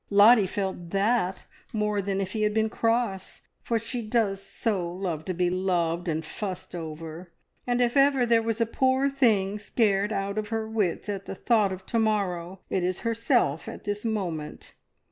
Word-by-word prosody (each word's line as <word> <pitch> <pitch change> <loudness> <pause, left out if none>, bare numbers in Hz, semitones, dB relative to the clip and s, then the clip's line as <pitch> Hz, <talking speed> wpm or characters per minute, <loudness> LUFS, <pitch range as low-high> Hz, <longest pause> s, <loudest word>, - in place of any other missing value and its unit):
Lottie 205 +1 +7
felt 190 -3 -3
that 195 -1 +1 0.3
more 210 -1 0
than 195 0 -2
if 190 -1 -3
he 220 - -2
had 210 0 +1
been 220 0 +2
cross, 225 -5 -1 0.2
for 230 - 0
she 230 +2 -3
does 215 -3 0
so 195 -5 -2
love 175 -4 -4
to 185 - -2
be 175 0 +1
loved 175 -2 0
and 160 -1 -1
fussed 185 -1 -4
over; 165 +1 -7 0.4
and 245 0 +1
if 240 +1 +2
ever 275 -2 +5
there 230 -1 +4
was 225 0 -1
a 230 - +3
poor 260 +4 +2
thing 210 -7 +2
scared 205 -1 +1
out 200 0 -1
of 210 - -4
her 220 0 -2
wits 210 -5 -1
at 200 -1 -4
the - - -6
thought 210 -1 +2
of 190 0 -7
to 230 - 0
morrow, 190 -4 -1
it 185 - -1
is 180 +1 -1
herself 230 - +1
at - - -9
this 205 0 -3
moment. 180 -9 -4
205 Hz, 185 wpm, -27 LUFS, 185-225 Hz, 0.4 s, Lottie